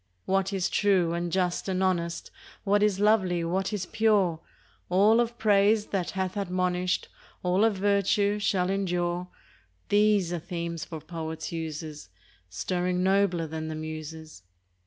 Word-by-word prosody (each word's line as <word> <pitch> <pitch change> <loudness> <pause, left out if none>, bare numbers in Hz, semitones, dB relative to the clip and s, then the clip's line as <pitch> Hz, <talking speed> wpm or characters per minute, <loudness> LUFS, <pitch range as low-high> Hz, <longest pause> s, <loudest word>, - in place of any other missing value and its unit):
What 195 0 +1
is 190 -2 0
true 185 -5 +2
and 170 0 -2
just 180 +1 0
and 190 0 0
honest, 170 -3 -1 0.3
What 205 0 +2
is 205 -2 +2
lovely, 195 -5 +3
what 190 +4 -1
is 205 -4 -2
pure, 200 -5 +2 0.3
— - - -35
All 205 +5 +5
of 235 0 0
praise 210 -1 +3
that 190 -3 -1
hath 185 0 -1
admonish'd, 180 -2 -1 0.4
All 180 +3 +2
of 225 -2 +3
virtue, 200 +1 +2
shall 190 -2 +1
endure, 180 -2 -1 0.3
— 95 0 -38
These 205 -4 +3
are 175 - -2
themes 170 0 -4
for 160 -3 -7
poets' 160 0 -6
uses, 155 - -6 0.4
Stirring 180 - -1
nobler 190 -3 +2
than 160 0 -5
the 160 - -4
Muses. 155 - -7
180 Hz, 150 wpm, -27 LUFS, 170-200 Hz, 0.4 s, All